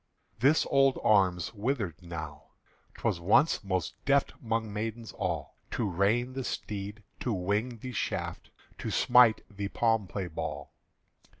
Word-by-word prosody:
This 140 +7 +4
old 135 -1 +4
arm's 95 -5 +3
withered 105 - -2
now. 80 -4 -7 0.5
'T - - -14
was - - +1
once 105 - +3
Most 95 -2 -2
deft 140 +1 +2
'mong 115 -1 0
maidens 110 +2 -4
all 85 -7 -3
To 115 - -1
rein 105 +7 +1
the 135 0 -3
steed, 105 -1 -5 0.2
to 125 - -1
wing 105 +5 -1
the 125 +3 -7
shaft, 120 - -3 0.3
To - - -3
smite 120 -3 +5
the 100 -1 -4
palm 110 -1 +1
play 95 0 -3
ball. 85 - -5
105 Hz, 140 wpm, -30 LUFS, 95-120 Hz, 0.5 s, smite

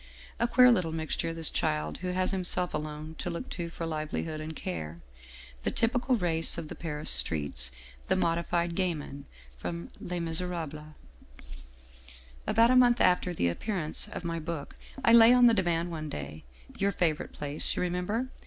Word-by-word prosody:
A 235 - +2
queer 250 +1 +6
little 180 -8 +1
mixture 160 +1 -2
this 165 -1 0
child 75 0 -1
who 185 - -5
has 185 0 +1
himself 180 -1 +2
alone 150 +1 -5
to - - -3
look 170 +9 -5
to 170 -2 -4
for 165 0 -6
livelihood 155 0 -3
and 155 +1 -6
care, 80 - -5 0.6
the - - 0
typical 245 +2 +1
race 165 -6 +2
of 160 -2 -5
the - - -5
Paris 155 -2 -2
streets, 70 -6 +1 0.4
the - - +2
modified 170 -1 0
gamin 155 -6 -3 0.3
from 85 +7 -6
' - - -23
Les 175 0 -4
Miserables/ 160 -3 -3 0.7
" - - -21
About 230 +2 +5
a - - +4
month 245 -1 +5
after 180 0 +3
the 155 - 0
appearance 155 - -2
of - - -7
my 165 0 -2
book 160 -2 -6 0.3
I 230 - +6
lay 235 +1 +9
on 245 -1 +6
the 235 - +6
divan 175 -4 0
one 155 -2 -5
day, 75 - -7 0.3
your 200 +1 +2
favorite 165 -5 -1
place, 145 +1 0
you - - -1
remem 180 0 -2
ber? 235 +5 -1
165 Hz, 175 wpm, -29 LUFS, 150-180 Hz, 0.7 s, lay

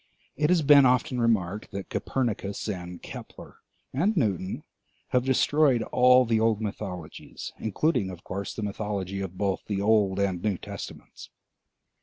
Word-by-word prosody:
It 150 +1 +1
has 175 -3 +3
been 140 -2 +7
often 125 0 +1
remarked 105 -4 0
that 100 -1 -7
Copernicus 110 -6 -2
and 90 -3 -6
Kepler - - -10 0.4
and 185 +10 +1
Newton 95 - -1 0.5
have 125 -1 +2
destroyed 135 -1 +3
all 125 0 +6
the 115 -1 +2
old 110 -1 +2
mythologies, 100 -6 -6
including 110 - 0
of 90 -2 -9
course 100 +1 -5
the 110 - -4
mythology 100 -2 -3
of 95 -1 -6
both 100 -1 0
the 100 -2 -1
Old 100 -2 +3
and 95 -3 0
New 105 -2 0
Testaments. - - -9
105 Hz, 145 wpm, -27 LUFS, 95-125 Hz, 0.5 s, been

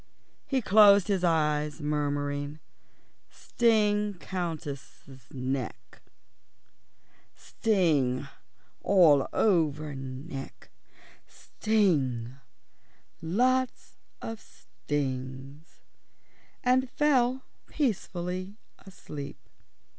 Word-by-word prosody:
He 270 -3 0
closed 205 -1 +6
his 190 -3 +1
eyes, 150 -3 +1
muttering, 145 -1 -2 0.7
"Sting 210 -3 +1
Countess 165 -7 -6 0.3
neck, 130 -2 -5 1.3
sting 150 - 0 0.5
all 160 -8 +5
over 155 -7 +1
neck, 135 +2 -8 0.6
sting 140 - 0 0.9
lots 250 +10 0 0.4
stings," 135 -2 -6 0.8
and 255 +1 +2
fell 260 -3 +2 0.2
peacefully 185 - -3 0.2
asleep. 160 -7 -9
165 Hz, 55 wpm, -28 LUFS, 145-210 Hz, 1.3 s, closed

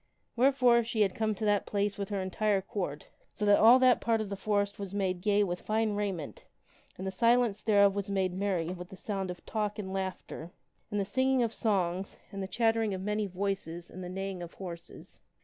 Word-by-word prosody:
Wherefore 250 -2 +4
she 225 -1 -1
had 195 -3 +3
come 215 0 0
to 215 - -3
that 205 -1 +2
place 205 0 0
with 200 - -3
her 200 -1 -2
entire 200 +2 +1
Court 180 -9 -4 0.3
so 210 - -2
that 205 0 +6
all 235 +3 +8
that 255 -1 +4
part 230 -1 +2
of 215 -2 -3
the 200 - -3
forest 205 0 -1
was 200 -1 -5
made 185 -3 -1
gay 205 +1 +3
with 175 -2 -3
fine 220 0 0
raiment 195 -7 -3 0.5
and 190 - -6
the 190 - -2
silence 230 +1 +3
thereof 200 -2 +4
was 200 0 -3
made 190 -2 0
merry 185 -3 -1
with 180 0 -6
the 190 - -11
sound 195 -2 -3
of 180 - -8
talk 210 -2 -2
and 190 -2 -5
laughter 190 -3 -5 0.4
and 205 - -1
the 200 - 0
singing 260 +4 +2
of 230 -1 -1
songs 190 -3 -1
and 195 -1 -5
the 190 - -3
chattering 225 0 +1
of 185 - -6
many 210 +1 -1
voices 185 -3 -4
and 185 - -8
the 180 - -6
neighing 195 0 -4
of 175 -1 -8
horses. 170 -3 -10
200 Hz, 215 wpm, -30 LUFS, 185-215 Hz, 0.5 s, all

